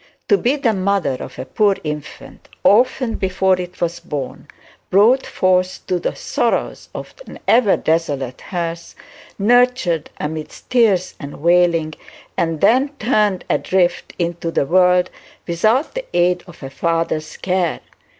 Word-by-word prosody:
To - - +6
be 255 +4 +2
the 255 -6 +1
mother 190 -8 0
of 130 - -8
a - - -5
poor 200 +8 +2
infant, 150 -1 -7
orphaned 245 +2 +3
before 185 -1 +1
it 180 0 -9
was 170 0 -2
born, 145 -6 -6 0.4
brought 225 +8 +4
forth 185 0 0
to 180 -1 -1
the - - -3
sorrows - - -2
of - - -7
an - - -10
ever 230 -4 +4
desolate 145 -6 -1
hearth, 170 -2 -5 0.4
nurtured 230 -7 +2
amidst 155 0 -6
tears 215 -7 +3
and 140 -1 -8
wailing, 170 -2 +3 0.4
and 165 -2 -1
then 260 +5 +4
turned 210 -6 +1
adrift 185 -2 0
into 170 -1 -2
the 165 - 0
world 180 +2 +3 0.3
without 215 - +1
the - - -5
aid 180 0 +2
of 170 -4 -14
a 135 - -7
father's 165 0 -2
care! 180 -3 -1
180 Hz, 140 wpm, -19 LUFS, 165-205 Hz, 0.4 s, To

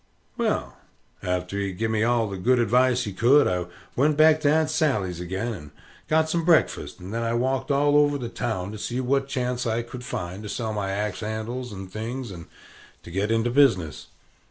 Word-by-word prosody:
Well, - - -1 0.4
arter 90 +2 -2
he 100 - -1
had 95 -2 -6
giv 110 0 -1
me 110 -1 +1
all 115 -1 +2
the 100 - -5
good 125 +7 +3
advice 125 +2 +3
he 105 - -5
could, 130 +9 +5
I 90 -1 -1 0.3
went 145 +3 +2
back 155 0 +6
to 145 - +3
Aunt 155 0 +2
Sally's 110 - 0
ag'in, 95 +7 -3
and 75 -6 -11 0.4
got 160 0 +3
some 165 +1 0
breakfast; 165 -1 +2
and 95 +3 -8
then 115 - -1
I 115 0 0
walked 130 +3 0
all 145 +1 +3
over 145 -1 +4
the 125 -4 -4
town, 105 -5 -3
to 110 - -8
see 120 +4 -3
what 135 +2 +1
chance 125 -2 -2
I 115 +1 0
could 125 +1 -9
find 90 -4 -5
to 105 - -7
sell 110 -1 -3
my 100 -2 -2
axe 105 +2 -2
handles 115 +3 -4
and 95 -2 -8
things 115 +2 -5
and 85 -3 -9 0.6
to - - -11
get 100 +4 -1
into 115 +1 +1
business. 105 - +2
115 Hz, 205 wpm, -25 LUFS, 100-135 Hz, 0.6 s, back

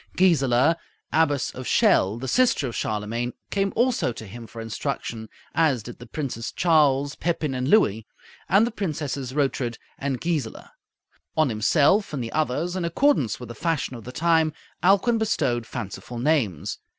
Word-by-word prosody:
Gisela, 155 -4 +4 0.4
Abbess 145 -4 +2
of 130 -2 -7
Chelles, 105 +5 +3
the 130 - -4
sister 240 - +3
of 120 - -6
Charlemagne, 110 +3 -2 0.2
came 195 -1 +1
also 240 - +2
to 110 -1 -9
him 115 +3 -9
for 115 - -10
instruction, 115 -1 -4 0.2
as 145 -9 +2
did 120 - -9
the 120 - -11
Princes 120 -3 -4
Charles, 145 -5 +3
Pepin, 155 -4 -1
and 130 0 -2
Louis, 110 - +3 0.4
and 200 +4 +5
the 240 - -3
Princesses 145 - -3
Rotrud 135 -5 0 0.2
and 135 -2 -2
Gisela. 155 -9 -3 0.7
On 155 -3 +4
himself 145 - +3
and 135 -4 -2
the 115 - -5
others, 155 +4 -1
in 185 - -2
accordance 170 - +2
with 125 -2 -9
the - - -6
fashion 160 -3 -2
of 115 - -9
the 125 - -8
time, 160 +1 +2 0.3
Alcuin 200 +6 +4
bestowed 125 - 0
fanciful 120 +1 -6
names. 120 - 0
140 Hz, 160 wpm, -24 LUFS, 120-165 Hz, 0.7 s, and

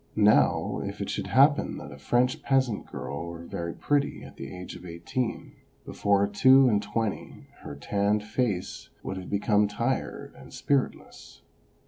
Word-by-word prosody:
Now, 105 0 +3
if - - -6
it - - -3
should - - -3
haj)pen 140 +4 +4
that - - -9
a 70 - -11
French 125 - +1
peasant 130 -5 0
girl 70 +3 -6
were 85 0 -8
very 85 0 -5
pretty 145 -1 0
at - - -12
the 70 0 -8
age 90 0 -8
of - - -11
eighteen, 90 +8 -4 0.3
before 100 -1 +2
two 130 +6 +6
and 105 -4 +2
twenty 105 +1 -4
her 70 - -8
tanned 100 +7 0
face 105 -4 -2
would 95 - -4
have 95 - -7
become 105 +1 +2
tired 115 +6 -3
and - - -14
spiritless. 140 -2 -3
105 Hz, 155 wpm, -27 LUFS, 90-125 Hz, 0.3 s, two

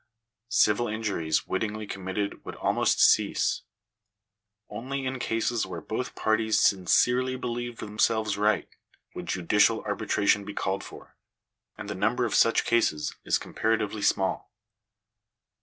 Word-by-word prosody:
Civil 120 +1 +3
injuries 105 -8 -1
wittingly 105 +2 -3
committed 95 +1 -4
would - - -8
almost - - +1
cease. - - +3 1.1
Only 135 +3 -5
in 130 0 -3
cases 115 -2 -1
where 90 -2 -6
both 120 +7 -5
parties 110 0 +1
sincerely 125 +7 +3
believed 120 -1 -4
themselves 110 0 0
right, 105 -1 +1 0.5
would - - -7
judicial 105 +5 +2
arbitration 100 0 +1
be 105 - -8
called 95 +1 -2
for; - - -13 0.6
and - - -7
the - - -3
number 115 +6 0
of 115 - -2
such 115 - +4
cases 110 -10 +1
is - - +2
comparatively 110 -1 -1
small. 95 -1 0
110 Hz, 125 wpm, -27 LUFS, 100-115 Hz, 1.1 s, such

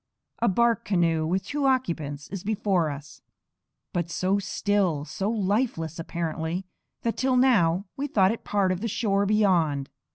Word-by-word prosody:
A 235 - +2
bark 235 +4 +2
canoe 165 -5 +1
with 185 +3 -1
two 285 -1 0
occupants 160 - -1
is 195 -2 -6
before 195 -6 +1
us; 145 0 -9 0.7
but 175 -2 -1
so 185 +4 +1
still, 195 -6 0
so 195 +5 -3
lifeless 200 - -1
apparently, 165 +2 -3 0.4
that 230 - -1
till 260 0 +2
now 200 -8 +3
we 285 +2 -2
thought 195 -7 +3
it 230 - -5
part 200 -2 +1
of 185 0 -2
the 230 - -1
shore 200 -2 +1
beyond. 170 -10 +2
190 Hz, 155 wpm, -26 LUFS, 165-215 Hz, 0.7 s, now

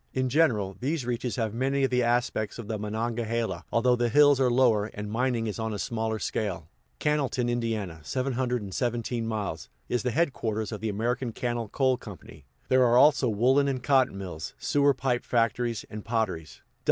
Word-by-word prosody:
In 130 0 +1
general, 115 -10 +2
these 140 +1 -2
reaches 120 0 -2
have 110 -4 -1
many 135 +3 0
of 135 - +1
the 125 0 +2
aspects 120 -3 0
of 115 -3 -7
the 110 -1 -3
Monongahela, 110 -2 -2
although 125 +1 +3
the 120 0 0
hills 145 +2 +5
are 130 -2 +3
lower, 120 -4 +3
and 105 0 -5
mining 120 0 0
is 110 0 -4
on 110 -1 -2
a - - -3
smaller 110 +1 -2
scale. 100 -7 -3 0.3
Cannelton, 140 -5 0
Ind. 110 -8 -2
(717 120 - -2
miles), 105 -7 -4 0.2
is 125 - 0
the 125 - -1
headquarters 115 -7 -1
of 105 -3 -6
the 110 - -1
American 120 +4 -1
Cannel 120 -1 -2
Coal 130 +1 +2
Co.; 105 -5 -9 0.5
there 130 0 +4
are, 120 0 +4
also, 140 -2 +5
woolen 130 +6 +3
and 130 -3 -2
cotton 130 -7 +3
mills, 90 -5 -6
sewer 145 -1 +2
pipe 125 -2 -1
factories, 115 -1 0
and 105 -1 -8
potteries. 110 - -3
120 Hz, 175 wpm, -27 LUFS, 110-130 Hz, 0.5 s, hills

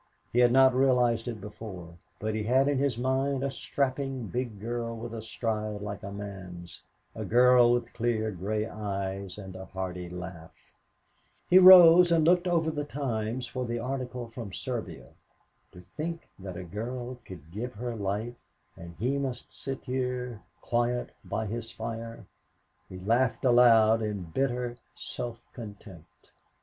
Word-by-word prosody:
He 120 - +3
had 120 -1 +6
not 130 0 +6
realized 125 -3 +3
it 115 -3 -4
before 95 -4 -9 0.3
but 110 +1 -2
he 110 - -1
had 130 +5 +3
in 145 -2 +1
his 135 -4 0
mind 130 +2 0
a 140 - -1
strapping 135 0 -2
big 120 0 -4
girl 115 +1 -3
with 115 0 -7
a 115 - -5
stride 110 -2 -3
like 100 -1 -5
a 100 - -7
man's, 95 -4 -8 0.3
a - - -5
girl 125 0 +6
with 120 -1 0
clear 115 -2 0
gray 105 +3 -2
eyes 100 -2 -4
and 95 -3 -9
a 95 0 -7
hearty 90 -2 -5
laugh. 90 -2 -10 0.8
He 185 - +9
rose 180 -2 +10
and 165 -2 +4
looked 180 +2 +4
over 165 -2 +2
the 150 -1 -3
Times 125 -4 -3
for 125 +2 -4
the 120 -1 -2
article 125 0 -4
from 115 -3 -8
Serbia. 120 +3 -5 0.6
To - - -12
think 160 - -6
that 95 -2 -7
a 90 - -5
girl 120 +7 -5
could 85 -4 -12
give 115 +6 -5
her 120 +2 -4
life 105 +4 -3 0.4
and 85 0 -10
he 130 +7 0
must 130 -3 -5
sit 135 -1 -6
here 125 -3 -3 0.2
quiet 120 +1 0
by 110 - -3
his 115 +2 -4
fire. 115 -1 -6 0.6
He 95 - -8
laughed 115 +8 +1
aloud 115 -3 +6
in 105 -3 -3
bitter 125 -2 -1 0.2
self 120 -1 -6
contempt. 100 -7 -12
115 Hz, 155 wpm, -29 LUFS, 105-130 Hz, 0.8 s, rose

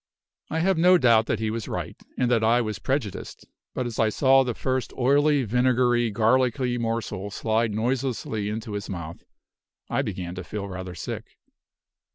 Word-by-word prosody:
I 160 +1 -1
have 190 -1 +2
no 180 +2 +6
doubt 115 -6 +4
that 110 - 0
he 110 0 -2
was 115 -1 -4
right, - - -4 0.2
and 125 -1 +1
that 115 -2 +3
I 115 +2 +4
was 110 -4 -3
prejudiced; 130 -8 -3 0.3
but 130 - -1
as 120 -2 -5
I 110 - +4
saw 135 +4 +4
the 125 -3 -3
first 130 -1 -2
oily, 145 +2 +3
vinegary, 120 0 +2
garlicky 120 +3 +1
morsel 115 -4 -3
slide 110 +2 0
noiselessly 120 -3 -1
into 110 +1 -5
his 100 0 -5
mouth, 85 -3 -7 0.7
I - - +2
began 90 -3 -4
to 90 0 -6
feel 100 +4 -5
rather 95 -1 -7
sick. - - -7
115 Hz, 170 wpm, -25 LUFS, 105-130 Hz, 0.7 s, no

